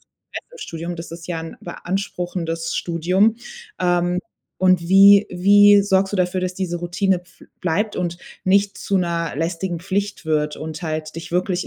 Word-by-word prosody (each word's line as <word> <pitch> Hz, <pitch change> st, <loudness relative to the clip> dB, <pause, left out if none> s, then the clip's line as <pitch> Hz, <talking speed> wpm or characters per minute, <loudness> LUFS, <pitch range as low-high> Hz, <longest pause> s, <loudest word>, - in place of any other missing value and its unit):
Stress -, -, -12 dB
im 485 Hz, -, -13 dB
Studium. 170 Hz, -, -6 dB
Das 165 Hz, 0 st, -8 dB
ist 165 Hz, 0 st, -9 dB
ja 170 Hz, -2 st, -3 dB
'n 165 Hz, 0 st, -8 dB
beanspruchendes 175 Hz, -2 st, -4 dB
Studium. 185 Hz, +6 st, +1 dB, 0.4 s
Ähm, 175 Hz, 0 st, +1 dB, 0.4 s
und 185 Hz, -1 st, +4 dB
wie 200 Hz, +2 st, +7 dB
wie 205 Hz, +3 st, +6 dB
sorgst 195 Hz, 0 st, +1 dB
du -, -, 0 dB
dafür, 180 Hz, 0 st, 0 dB
dass 185 Hz, 0 st, -3 dB
diese 180 Hz, -2 st, -3 dB
Routine 175 Hz, +2 st, 0 dB
bf 180 Hz, 0 st, -23 dB, 0.2 s
bleibt 195 Hz, +5 st, -1 dB
und 175 Hz, -1 st, -2 dB, 0.3 s
nicht 200 Hz, +1 st, +2 dB
zu 195 Hz, -, -1 dB
'ner 170 Hz, -4 st, -1 dB
lästigen 170 Hz, +2 st, -2 dB
Pflicht 200 Hz, +1 st, -3 dB
wird 150 Hz, -1 st, 0 dB
und 155 Hz, 0 st, -6 dB
halt 155 Hz, -1 st, -4 dB
dich 165 Hz, -, -7 dB
wirklich 180 Hz, +1 st, 0 dB
180 Hz, 165 wpm, -21 LUFS, 170-195 Hz, 0.4 s, wie